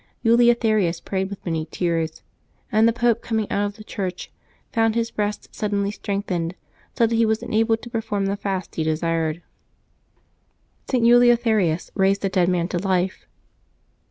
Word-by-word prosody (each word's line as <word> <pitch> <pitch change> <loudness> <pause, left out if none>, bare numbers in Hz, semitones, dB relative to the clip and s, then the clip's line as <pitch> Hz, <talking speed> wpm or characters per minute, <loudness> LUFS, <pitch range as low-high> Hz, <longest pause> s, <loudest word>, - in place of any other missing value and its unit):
Eleutherius 225 -6 +3
prayed 190 +2 -3
with 200 - -9
many 160 -2 -2
tears, 165 -3 -2 0.5
and 220 +1 +4
the - - +4
Pope, 235 0 +1
coming 220 -2 -1
out 205 0 +1
of 205 - -8
the 215 - -11
church, 185 -4 -5 0.4
found 225 -1 +2
his 230 0 0
breast 210 0 -3
suddenly 205 -1 -1
strengthened, 185 -5 -3 0.4
so 235 - +5
that 230 - -1
he 230 - +3
was 220 0 +1
enabled 225 +1 +1
to 240 - -8
perform 210 -3 -2
the 195 +1 0
fast 190 -3 -4
as - - -17
he 160 - +1
desired. 160 +1 -1 1.5
St. 250 -3 +2
Eleutherius 230 -8 +4
raised 195 0 +2
a - - +1
dead 185 -2 +2
man 175 -2 +1
to 175 - -1
life. 185 0 -1
200 Hz, 160 wpm, -23 LUFS, 180-225 Hz, 1.5 s, so